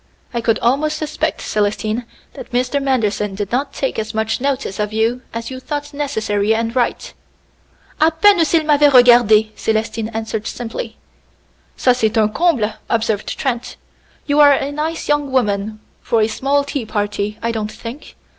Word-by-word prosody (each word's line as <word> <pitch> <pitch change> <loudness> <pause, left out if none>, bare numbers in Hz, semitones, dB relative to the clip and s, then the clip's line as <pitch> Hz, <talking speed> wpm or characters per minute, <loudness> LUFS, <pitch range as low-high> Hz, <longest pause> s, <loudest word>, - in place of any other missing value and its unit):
I 235 - -1
could 225 -1 +2
almost 295 +6 +1
suspect, 310 +1 -2
Célestine, 215 +2 -1 0.3
that - - -10
Mr. 250 +3 0
Manderson 210 -7 0
did 205 0 -4
not 275 +3 -1
take 270 - -2
as 220 0 -4
much 220 +2 -1
notice 270 -7 -2
of 210 0 -1
you, 225 +3 0
as 230 +2 -5
you 260 - -6
thought 290 +2 -5
necessary 220 -7 0
and 230 +1 -2
right." 245 -2 -1 0.9
"A 315 - +5
peine 340 +3 +4
s'il 320 0 +2
m'avait 295 -1 +5
regardé!" 240 -4 +6
Célestine 220 0 -2
answered 220 -1 -4
simply. 225 -1 -6 0.8
"Ca, 250 - +4
c'est 225 -3 0
un 215 -1 +4
comble!" 255 -11 +1 0.2
observed 220 -2 -1
Trent. 245 -2 -3 0.5
"You 290 0 +1
are 290 -1 +8
a 275 +1 -1
nice 310 +3 -3
young 295 -2 0
woman 215 -4 0 0.2
for 230 - +1
a 215 - +3
small 275 +5 0
tea 280 -4 -4
party, 205 0 -2
I 230 - 0
don't 215 -2 -3
think. 235 +6 -9
235 Hz, 165 wpm, -18 LUFS, 220-280 Hz, 0.9 s, are